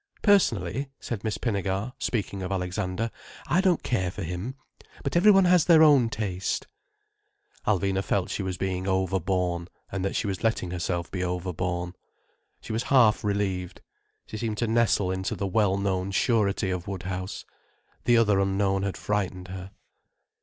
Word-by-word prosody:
"Personally," 135 - +2
said 110 -4 -5
Miss 110 -2 -1
Pinnegar, 100 +1 -2
speaking 100 -4 -2
of 95 +1 -4
Alexander, 90 +3 -2 0.3
"I 185 - +2
don't 185 -4 +2
care 95 -8 0
for 95 +3 -6
him. 90 +10 -4 0.5
But 140 - -2
every 185 +5 +6
one 195 -2 +6
has 180 -3 +5
their 160 -2 +7
own 140 -7 +6
taste." 100 -5 -2 1.0
Alvina 95 -1 +1
felt 95 -2 0
she - - -2
was 95 -1 -3
being 95 0 -2
overborne, 90 -2 0 0.2
and 95 -1 -3
that 95 - -1
she - - 0
was 95 -2 -3
letting 110 -6 0
herself 85 -1 -2
be 90 -1 -2
overborne. 90 0 -2 0.7
She - - -6
was 110 - 0
half 120 -6 +5
relieved. 100 -3 -2 0.4
She 110 - -7
seemed 110 -2 -2
to 115 - 0
nestle 110 -4 +2
into 95 0 -2
the 100 - -3
well 100 0 +2
known 95 -1 -1
surety 100 -2 +1
of 90 -2 -4
Woodhouse. 95 -1 -5 0.6
The 120 -1 +5
other 105 -4 +4
unknown 95 0 +1
had 100 -1 -2
frightened 95 -3 -2
her. 95 0 -7
95 Hz, 160 wpm, -26 LUFS, 90-115 Hz, 1.0 s, their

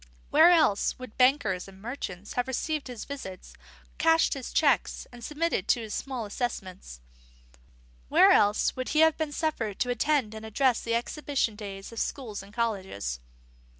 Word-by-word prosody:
Where - - +7
else 310 - +3
would 255 -3 -10
bankers 250 -9 +2
and 190 -1 -14
merchants 205 -4 -6
have 245 0 -1
received 300 +3 -2
his 245 -3 -7
visits, 225 -10 -8 0.5
cashed 325 0 +4
his 270 -3 -6
cheques, 285 -5 +2
and 240 -1 -12
submitted 300 - -1
to 240 - +2
his 215 -2 -6
small 255 -5 -4
assessments? 190 - -5 1.1
Where - - +6
else 205 +1 +3
would 255 0 -4
he 310 - +3
have 320 -1 +5
been 315 -2 -3
suffered 265 -10 -2
to 250 - 0
attend 250 -2 +1
and 220 0 -8
address 240 +3 +1
the 230 0 -1
exhibition 255 -1 -1
days 195 -1 -8
of 230 - -6
schools 230 -7 -3
and 200 +1 -14
colleges? 190 - -2
240 Hz, 160 wpm, -28 LUFS, 205-280 Hz, 1.1 s, Where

